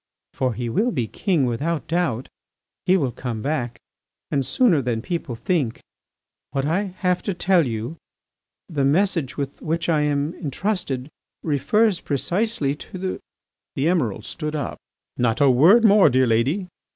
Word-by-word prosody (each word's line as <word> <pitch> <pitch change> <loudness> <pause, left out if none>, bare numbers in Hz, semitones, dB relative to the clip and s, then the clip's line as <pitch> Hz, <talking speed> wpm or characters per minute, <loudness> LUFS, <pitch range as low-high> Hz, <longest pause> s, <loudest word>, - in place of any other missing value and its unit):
For 130 -3 -1
he 120 -1 -3
will 210 - +1
be 125 - -1
king 170 - 0
without 145 +7 -2
doubt. 160 -8 0 0.6
He 185 +1 +5
will 135 -8 0
come 115 -3 -5
back 130 -5 -2 0.5
and 140 -2 +1
sooner 185 - +3
than 120 -3 -1
people 165 -7 -3
think.... 140 - -1 0.7
What 135 0 -1
I 175 +7 +1 0.2
have 180 0 +2
to 200 - -3
tell 175 -4 +3
you, 115 +7 -4 0.7
the 150 -6 -1
message 165 -1 +1
with 140 -1 -4
which 165 +2 -1
I 155 -3 +3
am 145 +1 0
entrusted, 160 -4 -2 0.4
refers 165 - +2
precisely 170 - -1
to.. 185 +4 -5 0.3
." - - -62
The 135 - 0
Emiral 130 - +1
stood 150 +3 -4
up. 145 - -4 0.4
"Not 120 -2 +1
a 140 -2 +6
word 180 - +6
more, 205 -5 +7
dear 130 0 +3
lady. 130 - +1
150 Hz, 150 wpm, -23 LUFS, 130-180 Hz, 0.7 s, more